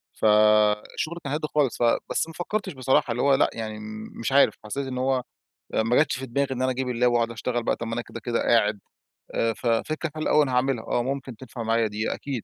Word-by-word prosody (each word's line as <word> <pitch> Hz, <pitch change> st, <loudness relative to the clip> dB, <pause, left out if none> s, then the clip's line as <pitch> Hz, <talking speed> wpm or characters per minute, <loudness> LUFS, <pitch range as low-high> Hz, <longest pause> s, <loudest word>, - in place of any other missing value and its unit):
فالشغل 105 Hz, +8 st, +3 dB
كان 140 Hz, 0 st, -3 dB
هادي 155 Hz, 0 st, -1 dB
خالص. 140 Hz, -5 st, +2 dB
ف -, -, -1 dB, 0.3 s
بس -, -, 0 dB
ما 165 Hz, -, -10 dB
فكرتش 190 Hz, +1 st, -3 dB
بصراحة 130 Hz, 0 st, +1 dB
اللي 120 Hz, -, -1 dB
هو 140 Hz, -1 st, +5 dB
لأ -, -, +3 dB
يعني 110 Hz, -1 st, -5 dB, 0.4 s
مش 115 Hz, -, -2 dB
عارف، 140 Hz, +1 st, +5 dB
حسّيت 135 Hz, +5 st, -3 dB
إن 130 Hz, -1 st, -4 dB
هو 130 Hz, -1 st, +1 dB, 0.5 s
ما 115 Hz, +2 st, +2 dB
جاتش 145 Hz, -3 st, +3 dB
في 135 Hz, -, -5 dB
دماغي 140 Hz, +3 st, 0 dB
إن 130 Hz, -, -3 dB
أنا 130 Hz, -, +2 dB
أجيب 130 Hz, 0 st, -2 dB
اللاب 125 Hz, 0 st, +2 dB
واقعد 115 Hz, -1 st, +1 dB
أشتغل 120 Hz, +1 st, -2 dB
بقى، -, -, 0 dB
طب 115 Hz, -, -5 dB
ما 115 Hz, -, -3 dB
أنا 120 Hz, -, -2 dB
كده 115 Hz, -, -9 dB
كده 115 Hz, +1 st, -1 dB
قاعد. 105 Hz, -3 st, +2 dB, 0.6 s
آآ 115 Hz, 0 st, +1 dB
ففكرة 135 Hz, +9 st, -1 dB
حلوة 155 Hz, -, -2 dB
أوي 150 Hz, -, +6 dB
أنا 135 Hz, -, -2 dB
هاعملها، 125 Hz, -2 st, +1 dB
آه 120 Hz, -, 0 dB
ممكن 135 Hz, -1 st, -4 dB
تنفع 120 Hz, 0 st, -8 dB
معايا 115 Hz, 0 st, +2 dB
دي 105 Hz, +2 st, -2 dB
أكيد 135 Hz, -5 st, -5 dB
125 Hz, 225 wpm, -25 LUFS, 115-135 Hz, 0.6 s, أوي